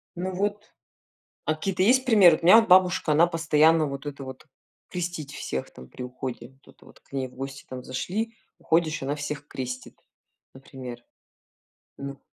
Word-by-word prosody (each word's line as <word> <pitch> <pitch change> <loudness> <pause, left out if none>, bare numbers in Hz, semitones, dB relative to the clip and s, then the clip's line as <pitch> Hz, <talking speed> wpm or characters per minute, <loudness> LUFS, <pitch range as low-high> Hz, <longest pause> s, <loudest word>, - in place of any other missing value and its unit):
Ну, 185 +2 -3
вот, 205 +2 -3 0.7
а 155 - +1
какие-то 185 +3 -1
есть 260 +5 +4
примеры? 195 -9 +7
Вот - - -10
у - - -1
меня 200 +5 +9
от 225 - 0
бабушка, 180 -4 +5
она 165 +3 +5
постоянно 160 -1 +3
вот 140 0 -6
это 140 -1 -6
вот 130 +2 -9 0.4
крестить 175 -5 -4
всех 65 0 -4
там 65 0 -13
при 125 - -8
уходе. 125 -1 -6 0.2
Вот - - -17
это - - -21
вот - - -18
к - - -32
ней 135 -1 -2
в 125 - -18
гости 135 +1 -7
там 130 -1 -7
зашли, 215 - -3 0.2
уходишь, 160 -2 +1
она 140 +2 -1
всех 145 0 -5
крестит, 125 -1 -6 0.5
например. 130 -2 -10 0.9
Ну. 140 0 -7
150 Hz, 175 wpm, -26 LUFS, 135-180 Hz, 0.9 s, меня